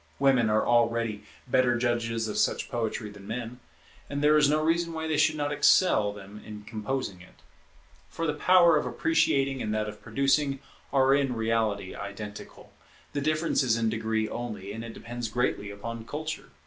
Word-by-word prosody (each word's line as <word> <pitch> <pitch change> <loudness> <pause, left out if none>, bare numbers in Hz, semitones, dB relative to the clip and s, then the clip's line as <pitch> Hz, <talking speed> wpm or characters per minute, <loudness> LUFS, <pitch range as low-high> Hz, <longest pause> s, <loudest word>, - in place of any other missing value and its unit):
Women 130 -5 +3
are 110 0 +2
already 115 -2 +1 0.3
better 125 -1 +3
judges 115 -2 -1
of 105 - -2
such - - 0
poetry 110 -2 -3
than 100 -1 -13
men; 120 +1 -5 0.5
and 145 0 -3
there 150 +1 +5
is 150 -2 +5
no 155 +1 +3
reason 165 +1 +1
why 160 0 -3
they 160 - 0
should 155 +1 +3
not 145 -1 -2
excel 150 - +4
them 105 +1 -11
in 105 -1 -9
composing 105 -2 -4
it. 90 - -17 0.7
For 165 - -4
the 150 - 0
power 175 -3 +5
of - - -1
appreciating 135 - +1
and 105 - -2
that 105 0 -1
of 105 0 -8
producing 135 +4 +1 0.3
are 135 -1 +4
in 140 -3 +1
reality 110 -4 -1
identical; 105 +1 -9 0.4
the 145 - -1
difference 155 +3 +1
is 120 -4 +2
in 115 -1 +1
degree 110 0 -1
only, 110 -5 -5
and 115 +1 -6
it 115 -1 -8
depends 120 0 -5
greatly 110 -2 -1
upon 115 +3 -7
culture. 155 +5 -5
120 Hz, 175 wpm, -28 LUFS, 110-140 Hz, 0.7 s, there